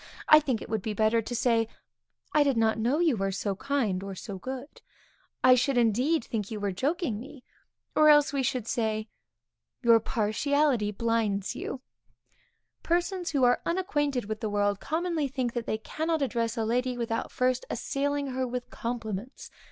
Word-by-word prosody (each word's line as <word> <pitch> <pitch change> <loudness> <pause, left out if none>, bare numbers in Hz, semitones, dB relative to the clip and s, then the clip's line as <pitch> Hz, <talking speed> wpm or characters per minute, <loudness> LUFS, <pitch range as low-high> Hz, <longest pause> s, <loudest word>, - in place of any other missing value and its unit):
I 305 - +9
think 260 -7 -2
it - - -9
would 220 -2 -2
be 215 +1 -3
better 220 +2 +3
to 240 +2 -5
say, 230 -2 +2 0.7
I 300 - +5
did 280 -4 +2
not 220 -1 +2
know 245 +6 +1
you 330 -6 +3
were 195 -2 -1
so 195 +1 -2
kind 225 -6 -1
(or 195 0 -6
so 195 0 -7
good) 260 +5 -7 0.6
I 255 - +8
should 255 +1 +2
indeed 245 +6 +2
think 210 -4 -4
you 215 - -5
were 205 -1 -1
joking 280 - -1
me. 260 +1 -11 0.5
Or 305 0 +6
else, 295 -1 +5
we 275 - +1
should 250 -3 -1
say, 220 -2 -1 0.7
your 230 -1 +6
partiality 235 +2 +1
blinds 210 -2 -1
you. 260 - -5 1.0
Persons 350 +1 0
who 280 -5 +1
are 245 0 +4
unacquainted 290 - 0
with 215 +1 -4
the 220 - -2
world, 205 -1 +1
commonly 325 -2 -1
think 255 -3 -2
that 240 -2 -3
they 215 - 0
cannot 315 +7 -2
address 235 -2 -1
a 225 - 0
lady 250 +2 0
without 230 -1 -2
first 255 0 +1
assailing 280 +2 -2
her 255 0 -1
with 245 0 -5
compliments. 230 0 -5
245 Hz, 175 wpm, -28 LUFS, 220-280 Hz, 1.0 s, I